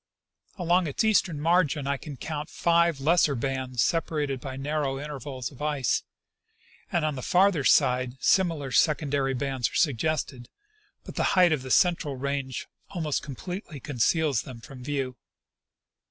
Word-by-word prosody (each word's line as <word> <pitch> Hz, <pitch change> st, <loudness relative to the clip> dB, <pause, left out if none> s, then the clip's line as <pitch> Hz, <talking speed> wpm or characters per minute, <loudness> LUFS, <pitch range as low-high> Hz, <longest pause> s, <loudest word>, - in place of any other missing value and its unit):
Along 175 Hz, -1 st, +2 dB
its 145 Hz, -, -1 dB
eastern 195 Hz, -8 st, +2 dB
margin 160 Hz, -3 st, +2 dB
I 140 Hz, 0 st, 0 dB
can 145 Hz, 0 st, -9 dB
count 150 Hz, +3 st, -5 dB
five 170 Hz, -3 st, +2 dB
lesser 155 Hz, 0 st, +3 dB
bands 130 Hz, 0 st, -1 dB
separated 150 Hz, -5 st, -1 dB
by 135 Hz, -1 st, -6 dB
narrow 140 Hz, -1 st, -2 dB
intervals 135 Hz, -4 st, -6 dB
of 140 Hz, -, -14 dB
ice, 145 Hz, -4 st, 0 dB, 0.9 s
and 170 Hz, -3 st, +1 dB
on 155 Hz, -, 0 dB
the 130 Hz, -, -6 dB
farther 180 Hz, 0 st, +3 dB
side 130 Hz, -2 st, +3 dB
similar 165 Hz, -8 st, +2 dB
secondary 140 Hz, -2 st, +2 dB
bands 135 Hz, -2 st, -1 dB
are -, -, -11 dB
suggested, 140 Hz, -3 st, 0 dB, 0.5 s
but -, -, -10 dB
the -, -, +2 dB
height 180 Hz, -2 st, +6 dB
of 155 Hz, -4 st, +1 dB
the 130 Hz, -, -8 dB
central 165 Hz, -2 st, +2 dB
range 135 Hz, -1 st, -3 dB, 0.2 s
almost 160 Hz, -6 st, -2 dB
completely 155 Hz, -, -7 dB
conceals 140 Hz, +1 st, +1 dB
them 125 Hz, -3 st, -10 dB
from 130 Hz, +1 st, -11 dB
view. 135 Hz, -2 st, -3 dB
145 Hz, 145 wpm, -27 LUFS, 135-160 Hz, 0.9 s, height